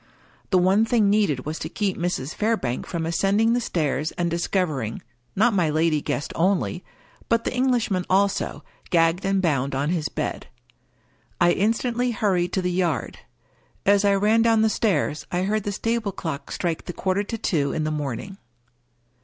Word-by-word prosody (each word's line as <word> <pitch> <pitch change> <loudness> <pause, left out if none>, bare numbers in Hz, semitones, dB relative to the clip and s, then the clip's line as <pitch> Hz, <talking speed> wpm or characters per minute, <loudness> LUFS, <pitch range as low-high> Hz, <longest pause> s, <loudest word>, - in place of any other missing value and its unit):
The 185 - +3
one 190 +4 +4
thing 225 -3 +3
needed 195 -12 +1
was 155 +2 -4
to - - -5
keep 200 -3 -1
Mrs. 170 -5 -2
Fairbank 210 - -1
from 165 -2 -3
ascending 200 +7 +2
the 245 - +1
stairs, 155 - -1
and 175 -1 -1
discovering 165 - -1 0.2
— 120 - -29
^not 225 +3 +4
my 175 -5 +2
lady 155 0 +1
guest 145 - -3
only 185 +1 0 0.2
— - - -29
but 230 0 +2
the - - -2
Englishman 245 -8 +1
also, 195 +1 +1 0.3
gagged 165 0 +2
and 195 0 +1
bound 140 -5 0
on 140 +4 0
his 165 -4 -1
bed. - - -4 0.9
I 175 0 +5
instantly 230 +5 0
hurried 190 -6 0
to 190 - 0
the 180 - 0
yard. 175 -3 -1 0.7
As 200 +1 +4
I 200 -1 +4
ran 210 +3 +3
down 225 -1 +4
the 220 - +4
stairs 155 -9 0
I 180 +1 0
heard 210 +1 -1
the 205 - -1
stable 225 +1 -1
clock 155 -6 -5
strike 170 -3 -2
the 180 - -5
quarter 190 +2 0
to 215 +2 -4
two 145 -9 0
in 155 - -2
the 155 - -1
morning. 150 - -4
185 Hz, 180 wpm, -24 LUFS, 160-210 Hz, 0.9 s, I